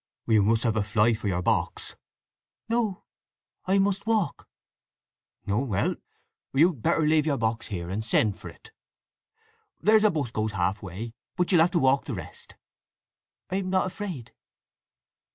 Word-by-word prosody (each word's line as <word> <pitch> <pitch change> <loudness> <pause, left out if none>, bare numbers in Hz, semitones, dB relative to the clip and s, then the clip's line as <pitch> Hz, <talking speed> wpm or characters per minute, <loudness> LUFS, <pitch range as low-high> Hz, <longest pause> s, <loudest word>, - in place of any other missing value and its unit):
"You 110 -2 +4
must 110 +3 +2
have 115 -3 +1
a 110 - +2
fly 110 +2 +2
for 110 -1 -4
your 90 -2 -1
box." - - -1 0.7
"No. 225 -5 -1 0.6
I 190 +1 +3
must 200 +1 0
walk." 220 -5 0 1.0
"Oh 105 +6 +1
well: 105 -7 0 0.6
you'd 150 -2 +3
better 160 - +2
leave 155 0 +3
your 140 -3 +1
box 115 +1 -1
here 85 -5 -5
and 100 +5 -3
send 110 -2 +2
for - - -10
it. - - -16 1.1
There's 215 0 +4
a 215 - +6
'bus 145 - -2
goes 110 -2 -2
half 95 +2 -1
way, 105 +4 -7 0.2
but 180 +1 +1
you'll 175 -3 +6
have 170 - +4
to 175 - 0
walk 135 -2 +3
the - - -4
rest." - - -9 1.0
"I 190 - 0
am 190 -1 -2
not 185 0 +2
afraid." 185 - -6
130 Hz, 160 wpm, -26 LUFS, -, 1.1 s, a